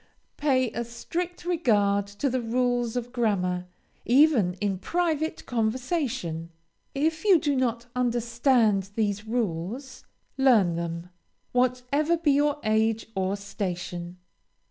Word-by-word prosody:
Pay 260 -5 +2
a 235 - -3
strict 340 +10 -5
regard 205 - +2
to 205 +7 -3
the 255 -1 0
rules 245 0 0
of 245 0 -3
grammar, 180 -7 0 0.4
even 245 - +4
in 195 0 -2
private 320 - -1
conversation. 225 - -2 0.5
If 315 +3 0
you 395 -4 +6
do 295 -3 0
not 240 -2 0
understand 235 -4 +2
these 210 -1 -1
rules, 230 +4 -3 0.4
learn 225 -10 +5
them, 170 +1 -4 0.4
whatever 255 +6 +1
be 320 -3 +2
your 290 +1 +2
age 220 +1 +1
or 190 0 -1
station. 180 -3 -5
235 Hz, 115 wpm, -26 LUFS, 200-270 Hz, 0.5 s, you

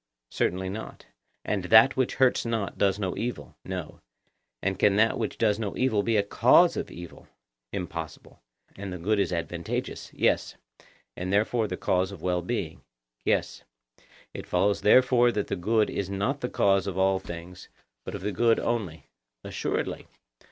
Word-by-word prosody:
Certainly 95 +1 -1
not. 110 +3 -8 0.4
And 100 -3 -1
that 110 +7 +7
which 130 -2 0
hurts 130 -2 +3
not 115 -4 -2
does 100 -1 +2
no 95 -4 -2
evil? 115 - -5
No. - - -6 0.6
And 95 +4 -2
can 100 -1 +4
that 110 +2 +3
which 110 - -3
does 105 -2 +2
no 105 -3 -4
evil 125 -5 +2
be 115 +1 +1
a 100 - +3
cause 100 - +5
of - - -4
evil? 85 -1 -11 0.4
Impossible. 85 -3 -7 0.3
And 100 -1 -6
the 90 - -5
good 100 +5 0
is 95 -3 +1
advantageous? 85 0 -4
Yes. - - 0 0.6
And 90 +1 -4
therefore 110 +2 +1
the 90 - -4
cause 95 +1 0
of 95 -5 -11
well 90 -1 0
being? 85 - -4 0.4
Yes. - - 0 0.7
It - - -8
follows 100 +3 +1
therefore 120 +1 +5
that 105 - -2
the - - -1
good 105 +4 +1
is 100 -2 -3
not 100 +9 -2
the 125 - -2
cause 100 0 +2
of 95 -2 -4
all 95 0 +2
things, 85 +1 -9 0.3
but - - -6
of - - -6
the 105 - -1
good 115 +4 +3
only? 100 -10 -3 0.4
Assuredly. - - -3
100 Hz, 165 wpm, -27 LUFS, 90-110 Hz, 0.7 s, that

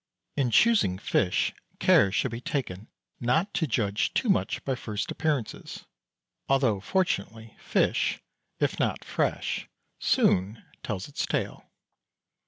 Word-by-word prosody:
In 135 -4 +1
choosing 205 - +4
fish 95 -2 +1 0.2
care 100 - +5
should 120 +5 0
be 115 +1 -5
taken 110 -8 -3 0.3
not 160 - +1
to 170 -5 0
judge 105 -4 0
too 245 - +1
much 195 - +1
by 135 - 0
first 110 -4 -4
appearances, 150 -8 -3 0.6
although, 130 -7 +3
fortunately, 110 - -2
fish, - - +1 0.4
if - - 0
not - - -1
fresh, - - -1 0.3
soon 100 +5 +2 0.2
tells 95 -3 -4
its 145 - -3
tale. - - -3
120 Hz, 120 wpm, -27 LUFS, 100-145 Hz, 0.6 s, care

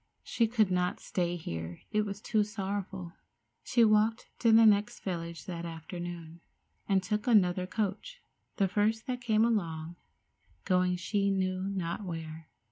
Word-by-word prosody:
She 230 - +1
could 220 -4 +2
not 180 0 0
stay 175 -1 -1
here; 85 - -6
it 210 0 +1
was 200 +1 -6
too 215 -2 +2
sorrowful. 195 -3 -4 0.5
She 235 -3 +3
walked 215 +2 +2
to 230 - +4
the 225 0 +7
next 210 -1 +3
village 170 -3 -5
that 170 -2 -5
afternoon, 170 0 -7 0.5
and 190 -1 +3
took 210 +5 -2
another 185 -5 +4
coach, 215 - -3 0.4
the 195 - +2
first 215 +4 +1
that 250 -2 -3
came 220 -2 +3
along, 170 -7 -1 0.7
going 180 -1 +2
she 200 +3 0
knew 185 0 0
not 185 0 -3
where. 160 -3 -7
190 Hz, 145 wpm, -30 LUFS, 175-215 Hz, 0.7 s, the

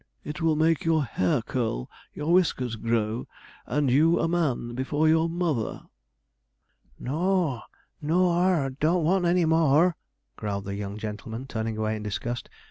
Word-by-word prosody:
It 150 +2 -6
will 160 -1 +3
make 160 0 +2
your 160 -2 +2
hair 105 -1 0
curl, 115 - -2 0.2
your 150 +3 -1
whiskers 130 -10 +2
grow, 115 0 -1 0.4
and 145 -3 +1
you 160 +6 +4
a - - +1
man 150 -8 -1
before 145 +5 0
your 160 +1 +3
mother.' 165 -9 -2 1.2
'N - - -8
o 180 +7 +2
a, 120 -3 -8 0.4
n 150 - -5
o 180 +2 +4
ar, 170 -6 +2
don't 155 +6 +1
want 180 +3 +2
any 175 0 +3
more,' 160 +1 +4 0.4
growled 100 -2 -3
the 100 - -4
young 100 0 -5
gentleman, 110 +3 -6
turning 110 -3 -3
away 110 0 -1
in 105 - -6
disgust. 115 +4 -4
145 Hz, 160 wpm, -26 LUFS, 115-165 Hz, 1.2 s, you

